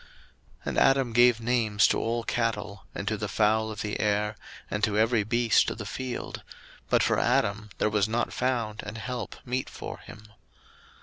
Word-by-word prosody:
01:002:020 - - -22 0.6
And - - -2
Adam 135 -3 +3
gave 120 -1 +5
names 115 -4 +2
to - - +1
all 115 +1 -1
cattle, 110 -7 -2
and 100 - -5
to 110 - 0
the 105 +1 -3
fowl 110 +2 +2
of 105 -2 -5
the 105 -1 -3
air, 105 0 +1 0.4
and 105 +1 -2
to 105 -1 +2
every 110 0 +3
beast 120 +1 +3
of - - -5
the 105 - -6
field; 125 +4 -5 0.5
but - - +4
for - - +2
Adam 105 +2 +1
there - - +2
was 105 0 +1
not 120 +2 -1
found 120 -4 -1
an 105 - -7
help 120 0 -5
meet 130 +1 -2
for - - -7
him. 110 - -12
110 Hz, 185 wpm, -27 LUFS, 105-120 Hz, 0.6 s, gave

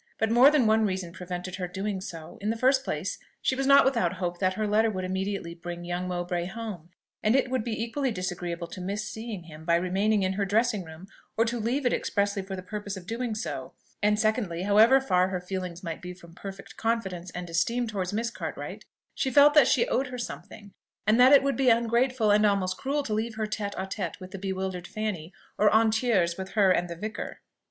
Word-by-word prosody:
But 220 0 0
more 245 +4 +8
than 295 -5 +3
one 220 0 +4
reason 185 -4 -2
prevented 180 0 -6
her 180 -2 -3
doing 190 +2 -3
so. 165 -5 -9
In 210 - -1
the 225 - 0
first 260 +2 +3
place, - - -3 0.2
she - - +1
was 270 0 -1
not 280 0 +7
without 230 -10 +2
hope 175 -2 -3
that 185 -1 +1
her 215 +1 -1
letter 220 +2 +3
would 185 -3 -3
immediately 190 -1 -3
bring 175 0 -7
young 175 +1 -3
Mowbray 175 -1 -2
home; 200 -5 -7 0.3
and 215 +3 +3
it 260 -2 +2
would 260 -4 0
be 225 -1 -2
equally 265 +4 -1
disagreeable 180 -4 -3
to 175 +2 -9
miss 200 +3 -3
seeing 220 -5 -6
him, 160 -2 -12
by 170 +1 +3
remaining 195 +4 +1
in 190 0 +1
her 200 +1 -1
dressing 215 +1 +1
room, 160 +2 -11 0.3
or 225 - +4
to 235 +1 -2
leave 250 +5 -1
it 245 - +3
expressly 200 -1 0
for 190 0 -6
the 185 - -7
purpose 205 0 -5
of 180 - -10
doing 230 +2 -3
so: 220 - -5 0.3
and 210 0 +3
secondly, 215 -6 0
however 220 +6 +6
far 185 -9 +2
her 190 -1 -2
feelings 180 0 -5
might 165 -2 -5
be 180 0 -7
from 170 -2 -15
perfect 195 +2 -9
confidence 190 -6 -2
and 175 0 -5
esteem 180 +9 0
towards 195 -4 -3
Miss 230 +3 -1
Cartwright, - - -6 0.3
she 265 - -1
felt 285 +3 +7
that 300 - +7
she 475 - +3
owed 275 - 0
her 250 0 -6
something, 205 -4 -8 0.3
and 215 +3 +4
that 255 +2 +8
it 280 -1 +8
would 275 0 +1
be 265 -2 +3
ungrateful 235 0 +2
and 210 +1 +4
almost 195 -3 +2
cruel 285 +5 -1
to 220 - -3
leave 220 +1 -2
her 220 0 -1
tête 210 -1 -4
à 190 - -3
tête 190 -3 -4
with 185 -1 -10
the 195 - -7
bewildered 190 -2 -3
Fanny, 205 -5 -4 0.3
or 210 0 +5
en 220 0 +4
tiers 205 -7 +1
with 190 0 -6
her 200 -3 +4
and 175 -1 +1
the 170 - -5
vicar. 210 +5 -6
205 Hz, 225 wpm, -27 LUFS, 180-230 Hz, 0.3 s, more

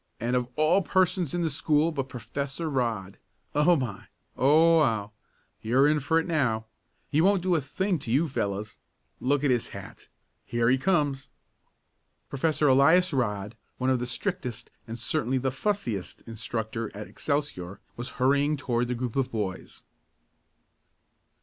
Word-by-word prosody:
"And 120 +3 0
of 125 -1 0
all 155 +6 +3
persons 180 -3 +1
in 175 - 0
the 165 - +1
school 150 +3 +2
but 135 -4 -3
Professor 135 +7 -4
Rodd. 115 -8 -2 0.3
Oh 150 +4 +4
my! 120 - -4 0.3
Oh 160 +5 +5
wow! 110 -8 +1 0.5
You're 130 +6 +3
in 150 0 +3
for 160 +4 +1
it 165 - -2
now! 130 -10 0 0.5
He 150 +1 +3
won't 190 0 +3
do 185 -1 +2
a 160 - +2
thing 190 +5 -1
to 130 - -8
you 145 +7 +3
fellows! 105 -5 -3 0.4
Look 140 +2 +1
at 140 - +3
his 120 -2 +1
hat! - - -10 0.4
Here 120 0 +1
he 130 - +3
comes!" 145 -5 0 1.0
Professor 150 +1 +1
Elias 160 +7 +5
Rodd, 105 -5 -1 0.2
one 130 +1 +1
of 130 - +2
the 125 - -3
strictest 125 - -4 0.2
and 115 +1 -6
certainly 130 +2 0
the 130 +1 0
"fussiest" 130 - -3
instructor 115 0 -4
at 105 - -6
Excelsior, 140 -11 -3 0.2
was 120 +2 -5
hurrying 140 +3 +2
toward 120 -3 -1
the 125 - -2
group 120 -1 -4
of 135 -2 0
boys. 100 -5 -5
135 Hz, 155 wpm, -27 LUFS, 115-155 Hz, 1.0 s, Oh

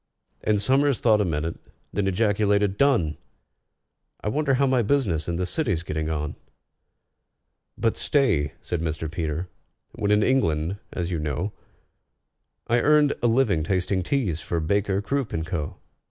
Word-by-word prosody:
And 105 -1 +2
SOMERS 135 +5 +2
thought 110 -3 +4
a - - +1
minute, 80 -1 -2 0.4
then 100 -1 0
ejaculated, 105 0 +2
"Done! 100 - +2 1.0
I - - -1
wonder 140 +3 +1
how 140 +2 +3
my 130 -2 +3
business 100 - +1
in 85 - -1
the 90 +1 -1
City's 90 - -1
getting 80 -1 -3
on?" 75 -1 -3 1.4
"But 115 - +1
stay," 85 - +1
said 85 - -2
Mr. 80 -1 -3
PETER: 80 +1 -3 0.4
"when 100 - -2
in 105 0 +4
England, 90 -8 +1
as 90 0 -3
you 85 - -1
know, 75 +7 -2 1.1
I 120 +1 +2
earned 150 -1 +4
a 120 - +3
living 115 -8 +2
tasting 95 +2 0
teas 95 - -1
for 85 - -2
BAKER, 100 +4 0
CROOP, 135 0 -2
AND 80 0 -2
CO. 80 -2 -4
100 Hz, 150 wpm, -25 LUFS, 80-120 Hz, 1.4 s, thought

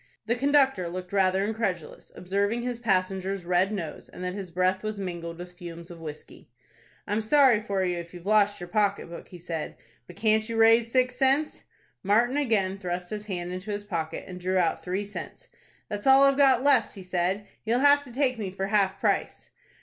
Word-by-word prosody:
The 225 - +1
conductor 265 -7 +2
looked 180 +1 -7
rather 190 0 +2
incredulous, 205 -7 -4
observing 200 +6 -1
his 245 -1 -3
passenger's 190 -3 -1
red 180 +3 +2
nose, 180 -7 -6
and 180 - -9
that 180 0 -2
his 195 -2 -6
breath 185 +2 +1
was 215 -1 -4
mingled 170 -3 -5
with 180 0 -10
fumes 170 -1 -9
of 170 - -10
whiskey. 155 -6 -10 0.6
"I'm 210 +2 -1
sorry 250 -1 +4
for 200 -2 -1
you 175 -1 -1
if 170 0 -9
you've 175 0 -11
lost 205 -1 +3
your 175 - -7
pocket 200 -1 0
book," 170 - -9
he 180 - -11
said; 165 -2 -5 0.3
"but - - -12
can't 220 0 +1
you 230 - -3
raise 225 +1 +5
six 255 0 +1
cents?" 270 +4 +1 0.4
Martin 230 +6 +2
again 200 -8 0
thrust 180 -1 -4
his 210 0 -5
hand 180 -3 -4
into 185 +3 -6
his 205 0 -3
pocket, 170 -6 -4
and 180 -1 -9
drew 185 +1 0
out 175 -3 +1
three 185 +3 -2
cents. 205 0 -9 0.4
"That's 205 +4 -4
all 270 +1 +7
I've 275 0 +5
got 265 -3 +4
left," 275 -6 +3
he 195 - -9
said. 185 +3 -1 0.2
"You'll 230 +2 +1
have 285 0 +5
to 250 - -11
take 255 -1 0
me 200 -3 -3
for 190 +1 -4
half 195 -2 +2
price." - - -1
200 Hz, 200 wpm, -27 LUFS, 180-230 Hz, 0.6 s, all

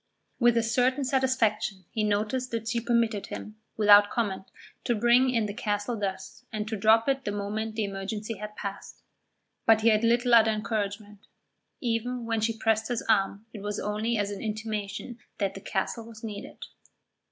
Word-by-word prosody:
With 240 -2 +4
a 230 - +3
certain 250 +4 +1
satisfaction 240 -7 0
he 220 - -1
noticed 215 +5 0
that 230 -1 -4
she 235 +1 0
permitted 230 -3 +1
him, 215 0 -8 0.2
without 205 -1 +7
comment, 195 -5 -2 0.4
to 240 - +2
bring 240 +4 +4
in 230 -3 +1
the 205 - -4
castle 210 +1 -2
thus 195 +2 -5
and 215 -1 -3
to 220 - -2
drop 220 +3 +4
it 270 0 +1
the 205 - -2
moment 210 +2 -3
the 220 - 0
emergency 205 +2 -4
had 210 0 -7
passed. 200 -1 -7 0.6
But 220 -1 +6
he 230 - +5
had 215 0 +3
little 240 +1 +3
other 225 -1 +7
encouragement. 210 -1 -3 0.5
Even 240 0 -2
when 225 -1 -1
she 225 0 0
pressed 220 0 +1
his 240 -2 -2
arm 200 -1 +1
it 210 - -8
was 205 0 -3
only 215 +3 -1
as 205 -1 -1
an 200 - -6
intimation 215 +2 -4 0.2
that 195 -2 -1
the 195 - -9
castle 220 +4 -3
was 225 -1 -12
needed. 210 -2 -7
220 Hz, 175 wpm, -27 LUFS, 205-235 Hz, 0.6 s, without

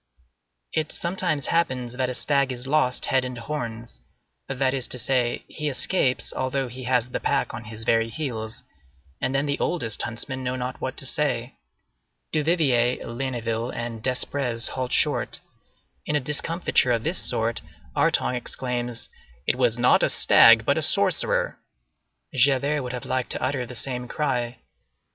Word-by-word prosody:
It 155 -1 -1
sometimes 170 -5 -1
happens 130 -8 0
that 130 0 -1
a 125 - -3
stag 140 -1 +1
is 125 0 -3
lost 135 -3 +2
head 130 -1 +2
and 125 -1 -5
horns; 115 - -5 0.5
that 135 -1 0
is 130 -2 -1
to - - -1
say, 125 0 0
he 150 -2 -3
escapes 135 -1 +1
although 130 0 -1
he 125 +1 -8
has 125 -1 +1
the - - -2
pack - - 0
on 110 - -7
his 110 +1 -7
very 115 0 +2
heels, 115 -6 -4 0.6
and 130 - 0
then 135 +1 +2
the 140 -1 -1
oldest 115 - -1
huntsmen 130 +3 -5
know 125 0 -1
not 125 0 -4
what - - -3
to - - -1
say. - - 0 0.8
Duvivier, 145 -6 +3
Ligniville, 120 -2 -3
and 120 -2 -5
Desprez 125 -1 0
halt 130 -1 -3
short. - - +2 0.7
In - - 0
a - - +4
discomfiture 150 -1 +2
of 115 -1 -1
this 170 +4 0
sort, 115 0 0 0.3
Artonge 125 - +2
exclaims, 120 -1 -3 0.4
"It - - +2
was 125 -2 +2
not 120 +1 +4
a - - +3
stag, - - +7
but - - +2
a - - -1
sorcerer." - - +2 0.7
Javert 140 +3 +3
would 125 -1 -5
have 125 - -5
liked 130 -1 -1
to - - -4
utter 130 -2 -1
the 125 - -9
same 125 +1 -3
cry. 125 -4 -1
125 Hz, 160 wpm, -25 LUFS, 120-140 Hz, 0.8 s, stag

